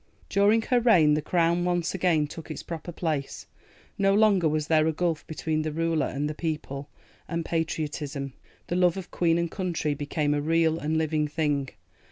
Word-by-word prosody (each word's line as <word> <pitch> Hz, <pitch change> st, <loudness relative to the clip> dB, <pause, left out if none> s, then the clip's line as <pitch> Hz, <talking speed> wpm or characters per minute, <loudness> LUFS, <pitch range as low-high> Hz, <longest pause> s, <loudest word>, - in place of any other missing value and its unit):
During 210 Hz, +3 st, +3 dB
her 250 Hz, +1 st, +2 dB
reign 180 Hz, -11 st, +5 dB
the 150 Hz, -, +1 dB
Crown 170 Hz, +2 st, +1 dB
once 175 Hz, -1 st, 0 dB
again 170 Hz, -5 st, +2 dB
took 160 Hz, +2 st, -9 dB
its 155 Hz, -, -6 dB
proper 170 Hz, +1 st, -6 dB
place: 155 Hz, -5 st, -3 dB, 0.5 s
no 195 Hz, 0 st, +4 dB
longer 200 Hz, -6 st, +4 dB
was 155 Hz, 0 st, 0 dB
there 155 Hz, 0 st, +3 dB
a -, -, +3 dB
gulf 165 Hz, 0 st, -2 dB
between 155 Hz, 0 st, -2 dB
the 155 Hz, 0 st, -2 dB
Ruler 165 Hz, -1 st, 0 dB
and 145 Hz, +2 st, -2 dB
the 150 Hz, -, -3 dB
People, 150 Hz, -3 st, -4 dB, 0.4 s
and 170 Hz, -1 st, -3 dB
Patriotism, 150 Hz, -4 st, -3 dB, 0.3 s
the 175 Hz, -, -3 dB
love 180 Hz, 0 st, +3 dB
of 190 Hz, -, -7 dB
Queen 165 Hz, -1 st, +2 dB
and 170 Hz, -1 st, -1 dB
Country, 175 Hz, -5 st, -1 dB
became 145 Hz, +1 st, -1 dB
a 145 Hz, -, 0 dB
real 165 Hz, +1 st, +2 dB
and 155 Hz, +2 st, -1 dB
living 155 Hz, -1 st, 0 dB
thing. 145 Hz, -3 st, -1 dB
160 Hz, 185 wpm, -27 LUFS, 150-175 Hz, 0.5 s, reign